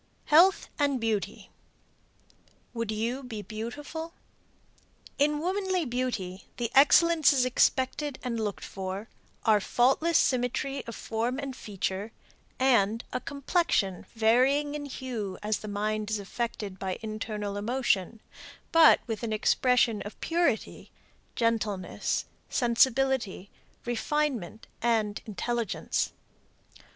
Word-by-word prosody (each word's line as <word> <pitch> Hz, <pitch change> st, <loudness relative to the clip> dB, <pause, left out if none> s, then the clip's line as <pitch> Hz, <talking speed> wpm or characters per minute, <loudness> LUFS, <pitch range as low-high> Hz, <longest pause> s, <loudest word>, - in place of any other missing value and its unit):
HEALTH 355 Hz, +5 st, +6 dB
AND 285 Hz, -3 st, +2 dB
BEAUTY 220 Hz, -3 st, -2 dB, 1.2 s
WOULD 230 Hz, -2 st, -3 dB
YOU 230 Hz, +5 st, -2 dB
BE 225 Hz, -5 st, -7 dB
BEAUTIFUL? 285 Hz, -, -6 dB, 1.0 s
In 295 Hz, +1 st, +3 dB
womanly 370 Hz, +1 st, 0 dB
beauty 235 Hz, -7 st, -3 dB
the 235 Hz, -2 st, -2 dB
excellences 295 Hz, -1 st, +5 dB
expected 260 Hz, +3 st, +1 dB
and 235 Hz, -3 st, -2 dB
looked 210 Hz, -3 st, -3 dB
for 195 Hz, +3 st, -5 dB, 0.4 s
are 215 Hz, -2 st, +5 dB
faultless 270 Hz, -, +3 dB
symmetry 260 Hz, +2 st, 0 dB
of 230 Hz, -, -6 dB
form 230 Hz, +3 st, -2 dB
and 275 Hz, -2 st, -5 dB
feature 200 Hz, -1 st, -4 dB, 0.5 s
and 230 Hz, -4 st, +3 dB
a -, -, 0 dB
complexion 280 Hz, -, 0 dB
varying 260 Hz, +6 st, +3 dB
in 295 Hz, -1 st, -4 dB
hue 240 Hz, -8 st, -5 dB
as 210 Hz, 0 st, 0 dB
the 215 Hz, -, -8 dB
mind 210 Hz, +1 st, -2 dB
is 215 Hz, -, 0 dB
affected 205 Hz, -2 st, -4 dB
by 190 Hz, -1 st, -3 dB
internal 215 Hz, -2 st, -4 dB
emotion, 220 Hz, -2 st, 0 dB, 0.5 s
but 330 Hz, -1 st, +7 dB
with 225 Hz, -3 st, -4 dB
an 230 Hz, -2 st, -3 dB
expression 230 Hz, 0 st, +2 dB
of 205 Hz, -, -8 dB
purity, 335 Hz, -9 st, -1 dB, 0.5 s
gentleness, 215 Hz, -5 st, -1 dB, 0.2 s
sensibility, 245 Hz, -4 st, +2 dB, 0.3 s
refinement 240 Hz, -4 st, -1 dB, 0.2 s
and 220 Hz, -3 st, +1 dB
intelligence. 225 Hz, +1 st, -2 dB
235 Hz, 105 wpm, -28 LUFS, 210-270 Hz, 1.2 s, but